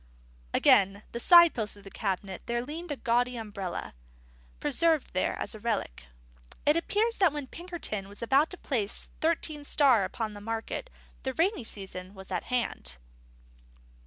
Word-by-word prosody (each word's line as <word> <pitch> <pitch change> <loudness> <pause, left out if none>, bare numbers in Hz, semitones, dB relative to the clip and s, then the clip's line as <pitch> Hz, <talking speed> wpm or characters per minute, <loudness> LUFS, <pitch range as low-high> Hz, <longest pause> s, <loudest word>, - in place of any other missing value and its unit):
Against 200 - +4
the 235 - -4
side 340 +4 +8
post 215 -3 -2
of 200 - -15
the 195 - -11
cabinet 195 -2 -3
there 235 0 0
leaned 325 +5 -6
a 290 - -1
gaudy 245 0 +1
umbrella, 200 -5 -5 0.7
preserved 325 - +2
there 185 - 0
as - - -2
a 215 - -7
relic. 210 - -3 0.6
It 295 - +5
appears 425 +7 +1
that 375 -5 +4
when 295 -1 -4
Pinkerton 310 - -4
was 205 +3 -8
about 275 +6 +4
to 365 - -6
place 220 -11 -2
Thirteen 315 -2 -1
Star 270 -7 +5
upon 215 +3 -3
the 205 - -9
market, 225 - -4 0.3
the 265 - -3
rainy 360 - +1
season 190 -2 -7
was 190 0 -10
at 180 - -2
hand. 230 - -2
235 Hz, 160 wpm, -29 LUFS, 200-310 Hz, 0.7 s, side